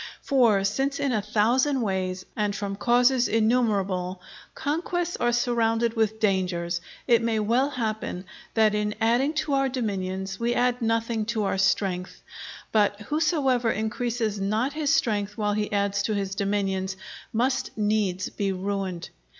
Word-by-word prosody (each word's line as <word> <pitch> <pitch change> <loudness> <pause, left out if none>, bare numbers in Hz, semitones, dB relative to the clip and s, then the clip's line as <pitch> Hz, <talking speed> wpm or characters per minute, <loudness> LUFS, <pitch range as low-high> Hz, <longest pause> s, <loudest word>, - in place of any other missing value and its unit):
For 230 -8 +3
since 275 +7 0
in 280 -2 0
a 215 -4 +1
thousand 240 +7 +2
ways, 185 -3 -2
and 210 -2 -1
from 200 -2 -3
causes 245 +3 +3
innumerable, 205 -5 +1 0.4
conquests 340 +3 -2
are 240 - +1
surrounded 235 -1 +1
with 220 -1 0
dangers, 180 -4 0 0.2
it 235 -2 +4
may 230 -1 0
well 235 +6 +2
happen 220 -7 -3 0.3
that 220 -2 +4
in 210 0 -1
adding 240 +6 +2
to 295 -1 -1
our 270 -1 +2
dominions, 190 -6 -3
we 235 +1 0
add 245 0 +1
nothing 230 -1 0
to 220 -1 -1
our 195 -1 -1
strength; 190 -1 0 0.5
but 205 -1 +2
whosoever 275 -3 +1
increases 220 -1 -1
not 220 +8 0
his 300 -2 0
strength 210 -6 0
while 210 -1 0
he 210 0 -2
adds 200 -1 +1
to 215 +1 -1
his 195 -1 -2
dominions, 195 -1 -1 0.3
must 245 +2 0
needs 205 -3 0
be 200 -1 -2
ruined. 190 -2 -3
215 Hz, 145 wpm, -26 LUFS, 195-245 Hz, 0.5 s, it